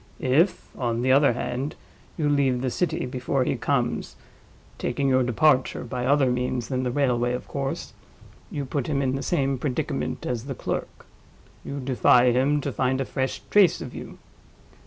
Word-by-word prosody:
If, 155 +9 +1
on 120 -2 -1
the 130 - +3
other 140 -1 +5
hand, 125 +4 -3 0.4
you 155 -3 +1
leave 135 -4 +2
the 130 - 0
city 175 -1 -1
before 130 +1 -1
he - - 0
comes - - -1 0.6
(taking 140 - -1
your 130 0 +4
departure 130 +2 +2
by 125 +1 -3
other 140 -2 +4
means 125 -1 -2
than 130 -1 -1
the 125 - -1
railway, 125 -2 +1
of 125 - -5
course) 135 -1 -4 0.6
you 145 -2 -4
put 135 0 -2
him 140 -2 0
in 130 -1 0
the 135 - -3
same 135 -5 0
predicament 130 -2 -2
as 120 -1 -3
the 135 -2 -5
clerk—you 140 +3 -7
defy 125 -1 +4
him 140 +4 +2
to 140 - -3
find 130 +3 0
a 135 - -1
fresh 130 0 -3
trace 200 -4 +5
of - - -7
you. - - -8
130 Hz, 170 wpm, -25 LUFS, 125-140 Hz, 0.6 s, other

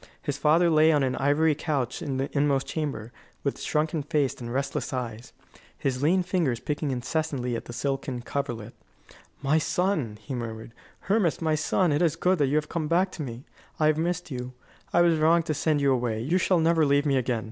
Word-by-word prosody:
His 145 -3 -3
father 160 +4 +3
lay 155 +1 +5
on 145 -3 +3
an 130 -1 0
ivory 145 +3 +3
couch 140 -5 -2
in 135 -3 -3
the 135 +1 -1
inmost 140 -2 +2
chamber, 140 -8 -4 0.3
with 140 - -2
shrunken 155 +1 0
face 145 -1 0
and 120 -1 -8
restless 135 +2 -2
eyes, 120 -3 -5 0.5
his 130 -2 -2
lean 180 +5 +3
fingers 170 -10 0
picking 150 0 -2
incessantly 130 -1 -2
at - - -5
the - - -8
silken 130 0 -3
coverlet. 120 -5 -4 0.7
"My 145 +3 +3
son!" 155 - -1
he 130 +5 -7
murmured; 115 -2 -6 0.3
"Hermas, 195 -5 +1
my 160 -2 0
son! 155 +3 +1
It 145 - +1
is 165 -4 +2
good 185 -1 +1
that 145 - +3
you 140 - 0
have 155 0 +1
come 160 -2 -2
back 180 +4 +2
to 165 - -7
me. 125 -2 -6 0.3
I 155 - +3
have 155 0 +3
missed 175 0 -2
you. 125 0 -5 0.4
I 175 - +4
was 170 -2 +4
wrong 165 +2 +4
to 155 - -1
send 150 0 +1
you 140 -1 +4
away. 120 -3 -1
You 155 +11 +1
shall 185 0 +2
never 165 0 +3
leave 145 0 +3
me 140 -2 +2
again. 125 -2 0
145 Hz, 205 wpm, -26 LUFS, 130-160 Hz, 0.7 s, lay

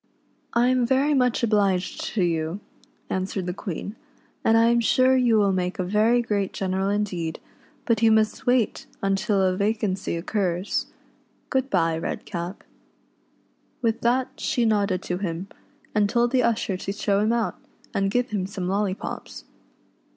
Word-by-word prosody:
" - - -41
I 240 +1 +3
am 255 -1 +2
very 265 +5 +2
much 250 -3 +2
obliged 200 -5 +1
to 195 - +2
you," 165 +1 -1 0.5
answered 190 0 -2
the 180 - -2
Queen, 195 +3 -6 0.5
"and 225 - +4
I 230 +1 +5
am 235 0 +3
sure 255 +3 +4
you 245 -3 +4
will 200 -2 +3
make 185 +1 -1
a 185 - -1
very 215 +6 +3
great 205 -4 -1
general 190 0 -1
indeed, 190 -6 -2 0.5
but 230 -2 +1
you 225 -1 +5
must 220 +1 +1
wait 245 -3 +1 0.3
till 195 0 +1
a 185 -1 +2
vacancy 200 -2 -1
occurs. 180 +1 -1 0.6
Good 265 0 +1
bye, 165 -5 +1
Redcap." 175 +2 -5 1.2
With 230 -1 +1
that 250 +2 +2
she 240 - 0
nodded 205 -4 +1
to 180 0 -3
him, 185 0 -4 0.4
and 210 -1 +2
told 235 +1 +2
the 260 -1 +3
usher 225 -5 0
to 195 - -4
show 200 0 0
him 215 +2 +2
out, 235 -1 -1 0.3
and 195 0 +1
give 245 +3 0
him 195 -3 -1
some 190 -2 -4
lollypops. 195 0 -3
205 Hz, 160 wpm, -24 LUFS, 185-235 Hz, 1.2 s, I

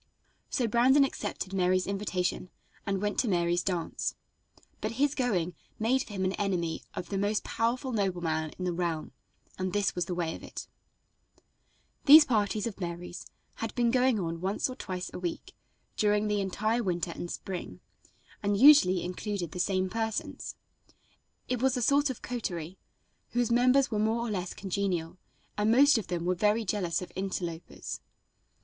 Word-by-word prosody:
So 245 -4 0
Brandon 255 +5 +5
accepted 205 -7 -3
Mary's 185 -1 +2
invitation 185 -2 -2 0.4
and 195 -1 0
went 205 0 0
to 250 - +2
Mary's 175 -2 +2
dance, 175 -3 -2 0.6
but - - -3
his 280 +4 +2
going 195 - 0 0.2
made 245 +4 +2
for 215 - -8
him 190 -1 -1
an 185 - +1
enemy 175 -5 -1
of 180 - -5
the 195 - -1
most 205 +1 0
powerful 250 +4 -1
nobleman 175 -7 -1
in 185 - -4
the 180 - 0
realm, 170 -2 -2 0.5
and 185 -1 -2
this 205 -2 +1
was 175 -1 -1
the 180 - -3
way 165 -2 -1
of - - -9
it. - - -8 1.4
These 300 +2 +10
parties 215 -4 +1
of 225 -4 -5
Mary's 175 0 -6 0.3
had 225 -1 -4
been 240 -1 +2
going 255 -2 +3
on 165 -2 -3
once 195 +3 0
or - - -7
twice 185 -7 -5
a - - -5
week 175 -2 -5 0.4
during 210 0 +2
the 210 -1 +1
entire 215 +5 0
winter 175 -4 -1
and 175 - -6
spring, 175 - -6 0.6
and 205 0 +1
usually 240 -8 +7
included 180 -1 -3
the 180 - -6
same 185 +1 +1
persons. 220 +2 -3 0.9
It 250 -2 -1
was 265 0 +2
a - - -1
sort 285 +4 +3
of 260 - -6
coterie, 185 -8 -4 0.5
whose 245 -1 +1
members 255 +3 +4
were 215 - 0
more 225 +2 +1
or - - -3
less 180 -3 -3
congenial, 185 -3 -2 0.4
and 210 +1 +2
most 275 +1 +6
of 210 - -7
them 175 -1 -2
very 210 +3 +2
jealous 185 -3 -1
of - - -10
interlopers. 175 -3 -4
200 Hz, 165 wpm, -29 LUFS, 180-230 Hz, 1.4 s, These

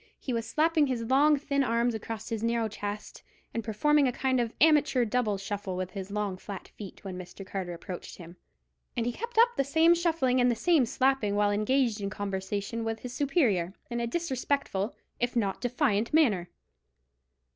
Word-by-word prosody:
He 255 - -4
was 230 -1 -2
slapping 315 -1 +3
his 245 -3 -2
long 285 +5 +4
thin 280 0 0
arms 235 -1 +1
across 220 0 -6
his 225 -2 -3
narrow 230 0 +1
chest, 205 0 -6 0.3
and 230 - -2
performing 280 +7 +3
a - - +1
kind 260 +1 0
of 230 -2 -2
amateur 295 -5 +4
double 220 -3 0
shuffle 195 -1 -4
with 185 0 -3
his 195 -1 -6
long 205 -2 -2
flat 195 0 -8
feet, 200 -3 -11
when 185 -2 -6
Mr. 185 +2 -9
Carter 190 -2 -4
approached 180 +1 -8
him; 170 -1 -11 0.6
and 230 - +1
he 245 - 0
kept 470 - -7
up 470 +2 +7
the - - +3
same 320 +5 +4
shuffling 320 -7 +2
and 245 - +4
the 240 - +2
same 305 0 +3
slapping 255 -5 +1
while 205 0 +3
engaged 220 +1 +1
in 200 - -2
conversation 200 +2 -3
with 225 0 -3
his 250 -1 -6
superior, 240 - +1 0.2
in 235 - -1
a 235 - -1
disrespectful 260 - -1 0.2
if 245 +1 -1
not 200 -5 0
defiant 245 -4 +1
manner. 210 - +3
230 Hz, 185 wpm, -29 LUFS, 205-270 Hz, 0.6 s, up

